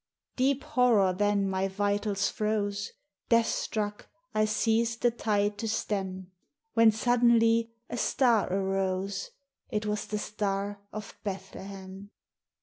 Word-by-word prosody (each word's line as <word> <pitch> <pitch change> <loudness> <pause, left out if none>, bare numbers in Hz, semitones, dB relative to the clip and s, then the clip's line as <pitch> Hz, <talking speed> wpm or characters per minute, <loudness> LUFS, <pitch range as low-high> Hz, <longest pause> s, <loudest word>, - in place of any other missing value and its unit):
Deep 270 +1 +1
horror 225 -7 +3
then 205 +1 +1
mv 190 0 0
vitals 205 0 0
froze, 205 -2 -1 0.4
Death 230 -1 +5
struck, 210 -2 -3 0.2
I 215 0 +3
ceased 225 +2 +1
the 240 - +5
tide 205 -3 0
to 225 - -2
stem; 190 -3 -3 0.4
When 225 -1 +6
suddenly 230 0 +3 0.2
a - - -5
star 235 -6 +2
arose, 195 0 -1 0.2
— 275 - -63
It 215 -3 -2
was 210 0 -2
the 210 - -2
Star 205 -1 -2
of 215 0 -7
Bethlehem. 195 0 -7
205 Hz, 125 wpm, -29 LUFS, 195-225 Hz, 0.4 s, When